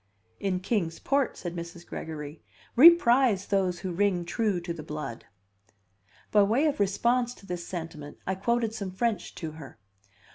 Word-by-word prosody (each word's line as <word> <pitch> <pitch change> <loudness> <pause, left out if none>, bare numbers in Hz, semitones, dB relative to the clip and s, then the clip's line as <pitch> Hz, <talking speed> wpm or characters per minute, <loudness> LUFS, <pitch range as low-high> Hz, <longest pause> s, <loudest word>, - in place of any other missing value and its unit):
"In 185 -2 -1
Kings 180 -5 -1
Port," 275 -1 0
said 175 -1 -5
Mrs. 170 0 -7
Gregory, 150 -1 -7 0.3
"we 300 +8 +11
prize 245 - +3
those 185 -3 0
who 185 - -3
ring 180 -1 +1
true 205 0 0
to 170 0 -5
the 165 - -7
blood." 150 -6 -6 1.1
By 210 - +6
way 225 +9 +3
of 295 -7 0
response 240 +5 +1
to - - -16
this 175 -2 -5
sentiment, 160 -4 -7
I 190 - 0
quoted 225 +3 0
some 200 -4 -4
French 205 0 -2
to 160 -3 -5
her. 155 -3 -11
190 Hz, 160 wpm, -28 LUFS, 170-230 Hz, 1.1 s, we